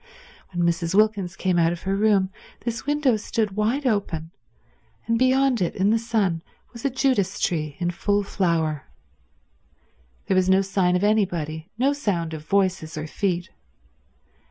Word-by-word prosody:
When 175 -1 0
Mrs. 170 +1 0
Wilkins 205 -4 +2
came 180 -2 +1
out 165 0 +3
of 175 - -6
her 195 +1 0
room 200 -2 +2 0.3
this 235 +3 -3
window 290 -5 +2
stood 215 0 -1
wide 220 +8 0
open, 175 -8 -1 0.7
and 230 0 +1
beyond 260 -2 +3
it 175 - 0
in 195 +2 +2
the 225 - +3
sun 215 -7 0 0.3
was 235 - -10
a 275 - +2
Judas 255 -7 0
tree 155 -5 -1
in 175 -1 0
full 205 +4 0
flower. 165 -7 -1 1.4
There - - 0
was 185 0 +3
no 190 +1 +5
sign 190 -2 +1
of 180 - 0
anybody, 175 -6 0
no 270 +4 +2
sound 175 - -2
of 155 -1 -6
voices 185 -3 0
or 155 - -3
feet. 175 +1 -2
195 Hz, 155 wpm, -24 LUFS, 170-220 Hz, 1.4 s, no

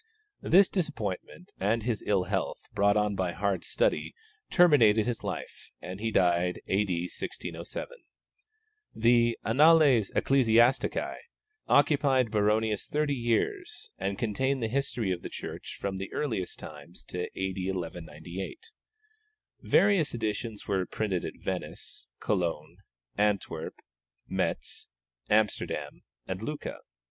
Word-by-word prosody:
This 190 +3 +6
disappointment 155 - -4
and 110 +4 +1
his 115 -3 -1
ill 100 -3 +3
health, 90 - -2
brought 100 0 +3
on 105 -1 +2
by 90 -2 -1
hard 100 0 -1
study, - - 0 0.3
terminated 120 - +5
his 120 -2 -3
life, - - -6
and 95 +2 -7
he 115 +1 -1
died 90 -3 +2
A.D. 100 0 +1
1607. 90 - -5 1.1
The 120 0 +4
Annales 140 -3 +5
Ecclesiastici 125 -1 +3 0.5
occupied 140 -5 +3
Baronius 105 0 +1
thirty 150 -1 0
years, 370 - -1
and 100 0 -2
contain 130 +6 0
the 115 - 0
history 125 -5 -1
of 90 -1 -2
the - - -6
Church - - -7
from 95 -1 -3
the 95 +1 -5
earliest 110 -11 -2
times 75 +3 -11
to 90 0 -4
A.D. 95 0 -2
1198. 90 - -6 0.9
Various 195 -9 +3
editions 110 -1 -3
were 95 -2 0
printed 95 -5 -2
at - - -4
Venice, - - -5
Cologne, 85 -6 -1 0.4
Antwerp, 100 -6 0 0.5
Metz, - - -2 0.4
Amsterdam, 105 -1 0 0.2
and 95 +1 -4
Lucca. 150 +6 -5
110 Hz, 115 wpm, -29 LUFS, 95-135 Hz, 1.1 s, This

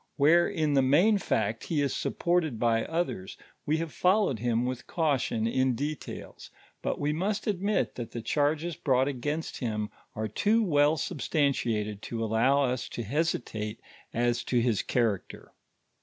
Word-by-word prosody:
Where 165 +5 +5
in 155 -6 0
the 135 - +5
main 175 +11 +4
fact 110 - -1
he 160 - -1
is 140 -2 0
supported 170 -7 0
by 115 -1 +2
others, 145 - -3 0.3
we 155 +2 +2
have 165 -1 -4
followed 185 - +2
him 120 +1 +1
with 125 0 -4
caution 140 -8 0
in 130 +2 +1
details, 145 +4 -6 0.3
but - - -2
we 145 +1 0
must 200 +6 -1
admit 205 0 0
that 120 -3 -6
the 120 - -6
charges 150 +6 0
brought 130 -1 +2
against 145 +4 -3
him 105 -4 -3 0.2
ore 110 0 -2
too 215 - +2
well 150 -4 +3
substantiated 120 - -1
to 115 -1 -4
allow 120 +6 +3
us 125 -1 -1
hesitate 120 -4 -2 0.4
ns 120 0 +1
to 125 - +2
Iiis 115 -3 +1
elmrncter. 115 -6 -1
135 Hz, 150 wpm, -28 LUFS, 115-160 Hz, 0.4 s, Where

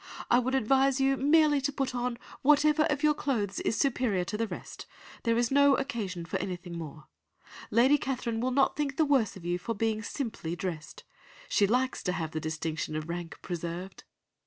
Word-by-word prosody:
I 240 - +6
would 260 +2 0
advise 270 +2 +3
you 270 0 +3
merely 295 +1 +4
to 280 +2 0
put 270 -2 -2
on 245 -1 -2 0.2
whatever 300 +2 +4
of 295 -1 -1
your 300 0 +5
clothes 225 -10 -2
is 225 - -1
superior 245 -9 +1
to 175 - -5
the 225 +1 -1
rest, - - -8 0.3
there 230 -1 +1
is 240 +1 +1
no 280 0 +5
occasion 200 -11 -3
for 170 - -2
anything 180 -2 -5
more. 155 -2 -8 0.6
Lady 260 +6 +4
Catherine 245 -4 -2
will 255 - +1
not 270 +1 +2
think 285 -2 -2
the 315 - +4
worse 255 -8 +2
of 175 - -12
you 175 +1 -1
for 230 +5 -3
being 220 +1 0
simply 220 - -4
dressed. 170 -4 -6 0.5
She 200 - +3
likes 255 +4 0
to 180 - -1
have 160 -4 -3
the 155 - -3
distinction 155 0 -3
of 155 +1 -4
rank 170 -1 -5
preserved. 175 +2 -5
230 Hz, 190 wpm, -29 LUFS, 180-270 Hz, 0.6 s, I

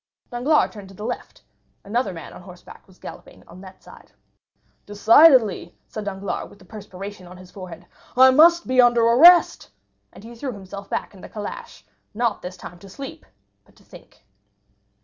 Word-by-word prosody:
Danglars 265 +6 +1
turned 205 -3 -12
to 195 - -15
the 210 - -8
left; 245 - -7 0.4
another 215 0 -2
man 165 -4 -10
on - - -12
horseback 180 -1 -15
was 190 -1 -22
galloping - - -13
on 185 - -14
that 190 -1 -15
side. - - -17 0.8
"Decidedly," 220 - +4
said 215 -1 -8
Danglars, 195 0 -5
with - - -18
the 190 - -20
perspiration 195 -1 -10
on 180 +1 -13
his 185 0 -15
forehead, 180 -3 -11 0.3
"I 260 +1 +7
must 340 +5 +5
be 255 0 +3
under 240 -1 +3
arrest." 330 +10 +5 0.4
And - - -16
he 230 +1 -11
threw 250 +2 -6
himself 200 0 -11
back - - -4
in 190 - -16
the - - -11
calash, 210 -1 -9 0.3
not 230 -2 -1
this 180 +1 -9
time 175 0 -12
to 195 - -15
sleep, 280 - -10 0.4
but - - -28
to - - -24
think. - - -18
205 Hz, 175 wpm, -21 LUFS, 185-245 Hz, 0.8 s, I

